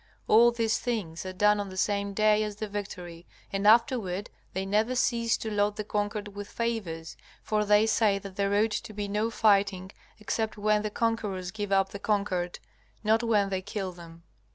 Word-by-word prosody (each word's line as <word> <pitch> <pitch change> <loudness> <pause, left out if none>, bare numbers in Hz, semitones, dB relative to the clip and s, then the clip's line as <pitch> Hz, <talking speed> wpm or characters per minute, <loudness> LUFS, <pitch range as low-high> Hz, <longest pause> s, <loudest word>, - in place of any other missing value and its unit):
All 235 +2 +7
these 230 -2 0
things 190 -8 -3
are - - -4
done 210 +2 +3
on 200 -1 -3
the 185 - -9
same 200 0 0
day 215 0 +4
as 210 -1 -4
the 215 +1 -4
victory, 180 -4 -7 0.3
and 195 +1 +1
afterward 220 -4 +3 0.2
they 190 +1 -2
never 215 +5 +1
cease 235 -2 +1
to 220 - -5
load 205 0 +1
the 210 - -3
conquered 205 0 -2
with 205 0 -8
favors, 200 -9 -3 0.3
for 215 -1 +1
they 210 +1 +4
say 215 -2 +3
that 195 -1 -9
there 200 0 +1
ought 215 +2 +3
to 215 - -4
be 205 0 -3
no 210 +3 0
fighting, 200 -4 +2 0.3
except 220 +1 -2
when 210 0 +2
the 215 - -2
conquerors 210 -5 -2
give 205 -1 -5
up 195 0 +3
the 200 - -8
conquered, 195 -4 -1 0.5
not 220 +1 +3
when 210 -4 +2
they 190 -1 -2
kill 190 0 -4
them. 170 -1 -13
205 Hz, 190 wpm, -28 LUFS, 195-215 Hz, 0.5 s, All